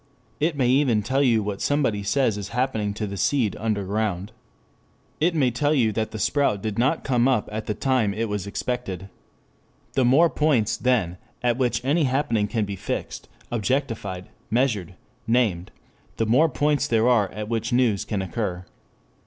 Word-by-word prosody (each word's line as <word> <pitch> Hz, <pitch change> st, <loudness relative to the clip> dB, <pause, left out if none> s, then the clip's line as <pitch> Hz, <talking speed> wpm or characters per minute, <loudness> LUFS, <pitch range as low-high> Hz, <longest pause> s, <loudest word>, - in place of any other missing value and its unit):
It 155 Hz, 0 st, 0 dB
may 130 Hz, -3 st, +2 dB
even 125 Hz, -5 st, +3 dB
tell 135 Hz, +5 st, +1 dB
you 115 Hz, -6 st, +3 dB
what 100 Hz, -1 st, -4 dB
somebody 135 Hz, -8 st, +1 dB
says 110 Hz, +2 st, +1 dB
is 100 Hz, -1 st, -6 dB
happening 110 Hz, -5 st, 0 dB
to 105 Hz, -, -3 dB
the 100 Hz, -1 st, -5 dB
seed 120 Hz, -2 st, +1 dB
under 105 Hz, -2 st, -1 dB
ground. 100 Hz, -1 st, -2 dB, 0.9 s
It 165 Hz, +2 st, +2 dB
may 135 Hz, -5 st, +2 dB
tell 145 Hz, +6 st, +1 dB
you 115 Hz, -6 st, +3 dB
that 110 Hz, +1 st, -2 dB
the -, -, -7 dB
sprout 140 Hz, -3 st, +1 dB
did 110 Hz, 0 st, -2 dB
not 130 Hz, +7 st, +1 dB
come 125 Hz, -2 st, +2 dB
up 130 Hz, -6 st, +1 dB
at 110 Hz, +1 st, -5 dB
the 105 Hz, -, -1 dB
time 125 Hz, -2 st, +1 dB
it 110 Hz, +3 st, -2 dB
was 105 Hz, -2 st, -3 dB
expected. 100 Hz, -4 st, -4 dB, 0.8 s
The 130 Hz, -, +2 dB
more 135 Hz, +8 st, +5 dB
points, 145 Hz, -9 st, +1 dB
then, 105 Hz, -9 st, 0 dB, 0.3 s
at 120 Hz, -1 st, +2 dB
which 125 Hz, -1 st, 0 dB
any 150 Hz, +3 st, +2 dB
happening 125 Hz, -6 st, +1 dB
can 110 Hz, -1 st, -1 dB
be 100 Hz, 0 st, -5 dB
fixed, -, -, -5 dB, 0.2 s
objectified, 115 Hz, -5 st, -2 dB, 0.2 s
measured, 110 Hz, -7 st, 0 dB, 0.3 s
named, 110 Hz, -7 st, +1 dB, 0.5 s
the 115 Hz, -, +1 dB
more 130 Hz, +9 st, +4 dB
points 145 Hz, +1 st, +1 dB
there 115 Hz, 0 st, +2 dB
are 115 Hz, -6 st, +3 dB
at 105 Hz, 0 st, -5 dB
which 115 Hz, +2 st, -2 dB
news 120 Hz, -5 st, +2 dB
can 100 Hz, -3 st, -2 dB
occur. 95 Hz, -1 st, -3 dB
115 Hz, 175 wpm, -24 LUFS, 105-130 Hz, 0.9 s, more